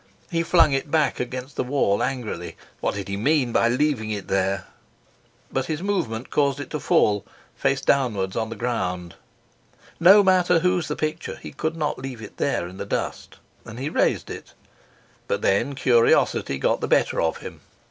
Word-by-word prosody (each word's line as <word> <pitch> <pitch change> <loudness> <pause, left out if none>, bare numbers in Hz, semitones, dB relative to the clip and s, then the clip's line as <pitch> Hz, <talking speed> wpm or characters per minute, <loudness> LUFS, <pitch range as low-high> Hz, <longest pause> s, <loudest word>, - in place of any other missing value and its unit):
He 165 -1 +1
flung 165 -3 +4
it 135 +2 -1
back 155 0 +1
against 130 +2 -5
the - - +1
wall 125 -6 +1
angrily 110 -10 -3 0.2
what - - -1
did 100 -1 -5
he 100 0 -3
mean 130 +2 +2
by 115 - +3
leaving 125 -3 0
it 105 -2 -4
there? 95 0 0 0.9
but 130 - -1
his 160 +2 -3
movement 130 - -2
caused 140 -2 +1
it 145 - -7
to 150 - -2
fall, 105 -5 +2 0.3
face 135 0 0
downwards, 110 -10 +1
on 110 - -1
the 115 - -6
ground. 90 -7 -3 0.9
No 195 +4 +8
mater 180 -2 +4
whose 180 -1 +1
the - - -2
picture, 155 +2 -3
he - - -10
could 160 +1 -3
not 150 -2 -2
leave 130 -2 -6
it 105 - -11
there 85 - 0
in 90 +1 -11
the 100 - -4
dust, - - -4 0.3
and 110 - -10
he 135 +4 -3
raised - - +1
it; - - -9 0.7
but - - -2
then 120 +8 +1
curiosity 120 - +3
got - - 0
the - - -1
better - - +2
of 80 - 0
him. - - -10
130 Hz, 180 wpm, -24 LUFS, 105-150 Hz, 0.9 s, No